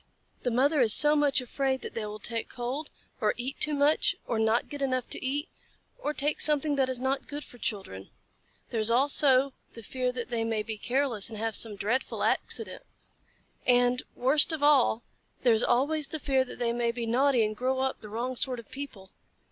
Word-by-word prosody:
The 245 - 0
mother 270 +5 +3
is 220 -4 +6
so 295 0 +5
much 290 -3 +2
afraid 265 +1 -1
that - - -6
they 220 -2 -3
will 210 0 -6
take 230 +2 -3
cold, 255 +5 -4 0.3
or 215 -2 +1
eat 255 +3 -4
too 305 -1 +1
much, 290 +2 +3
or 225 - -1
not 220 +2 +2
get 290 -1 -7
enough 255 -2 0
to - - -3
eat, 285 +5 -1 0.5
or 300 - -2
take 295 0 0
something 300 -1 +1
that 265 -2 +1
is 255 -2 -1
not 270 +1 -1
good 290 +1 -6
for 245 - -14
children. 190 - -4 0.6
There 230 - -1
is 215 +1 +2
also 270 +1 +3 0.2
the 230 - -10
fear 255 +3 -2
that 250 0 -6
they 230 -1 0
may 225 -1 -1
be 220 -1 -6
careless 245 -5 0
and 220 - -7
have 225 0 -1
some 220 -3 0
dreadful 220 +6 -1
accident. - - -2 0.9
And, 245 0 +4
worst 290 +6 +4
of 315 -2 -3
all, 265 -6 +4 0.4
there 245 -2 +5
is 220 - +2
always 290 +5 +1
the 315 - -5
fear 270 -2 +2
that - - -9
they 235 -1 0
may 235 -1 0
be 235 0 -4
naughty 250 0 +3
and 215 0 -3
grow 255 +3 -1
up 265 0 -1
the 215 - -10
wrong 240 +4 -3
sort 255 0 -1
of 230 - -13
people. 240 -9 -8
255 Hz, 205 wpm, -28 LUFS, 230-280 Hz, 0.9 s, is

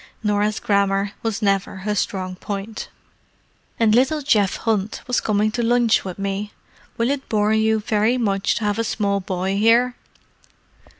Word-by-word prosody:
Norah's 210 0 +1
grammar 200 0 +1
was 225 -1 -2
never 195 -1 +1
her 210 - 0
strong 185 -2 -2
point. 200 +3 -6 0.9
"And 220 -2 +4
little 270 +6 +2
Geoff 205 -8 +2
Hunt 215 -2 -1
was 250 0 0
coming 215 0 +1
to 240 +2 -2
lunch 235 -1 +3
with 185 -2 -6
me. 200 +1 -3 0.4
Will 235 +3 +1
it 280 -1 -4
bore 210 -1 +2
you 220 0 +2
very 220 +2 +1
much 200 -4 0
to 230 - -3
have 205 +1 0
a - - +2
small 200 -2 0
boy 190 +1 -2
here?" 235 +3 +4
210 Hz, 160 wpm, -21 LUFS, 200-230 Hz, 0.9 s, And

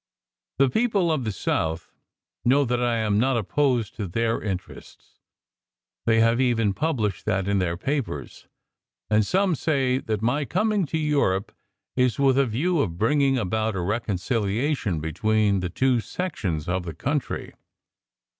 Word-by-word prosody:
The 135 - +5
people 200 - +1
of 145 -6 -1
the 110 - -1
South 80 -3 -2 0.5
know 140 +4 +4
that 125 0 0
I 120 -1 +1
am 105 -2 +1
not 130 +1 +2
opposed 120 0 0
to 105 -4 -3
their 115 +5 0
interests. 95 -3 -7 0.9
They 115 0 +4
have 115 +2 +3
even 115 -5 +2
published 115 - -1
that 95 0 0
in 100 -1 +2
their 85 -2 -1
papers, 120 - -4 0.6
and 105 0 +4
some 190 - +2
say 135 -4 +1
that 110 -4 -3
my 135 +6 +1
coming 205 +3 0
to 160 - -2
Europe 140 -11 +1 0.4
is 125 -3 +2
with 135 -1 +3
a 135 - +3
view 155 +10 0
to 135 - +1
bringing 135 - +1
about 110 0 -1
a 90 - -2
reconciliation 105 - -1
between 100 +5 +1
the 90 -1 -3
two 130 +6 +2
sections 105 - -3
of 90 +1 0
the 80 -3 -6
country. 145 - -3
115 Hz, 150 wpm, -25 LUFS, 100-140 Hz, 0.9 s, The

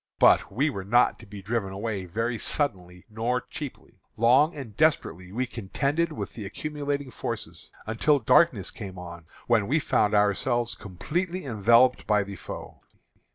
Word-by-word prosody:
But - - +5
we 140 +9 +1
were 95 -6 -5
not 120 +6 +3
to - - -13
be 100 -1 -10
driven 105 -2 -2
away 100 -1 -3
very 115 +6 -2
suddenly 90 - -3
nor 115 +3 -1
cheaply. 145 +1 -9 0.2
Long 130 +8 +4
and 125 -8 -8
desperately 95 - +1
we 125 +5 -1
contended 140 - -1
with 155 - -5
the 110 - -7
accumulating 145 +5 -4
forces, - - -6 0.2
until 115 +7 +2
darkness 125 - +3
came 95 -2 -8
on, 85 -2 -9 0.2
when 110 -4 +2
we 150 - +2
found 105 -8 +2
ourselves 115 +4 +2
completely 170 - -4
enveloped 120 +2 +4
by 105 -1 +3
the 100 0 -8
foe. - - -9
115 Hz, 155 wpm, -26 LUFS, 100-140 Hz, 0.2 s, But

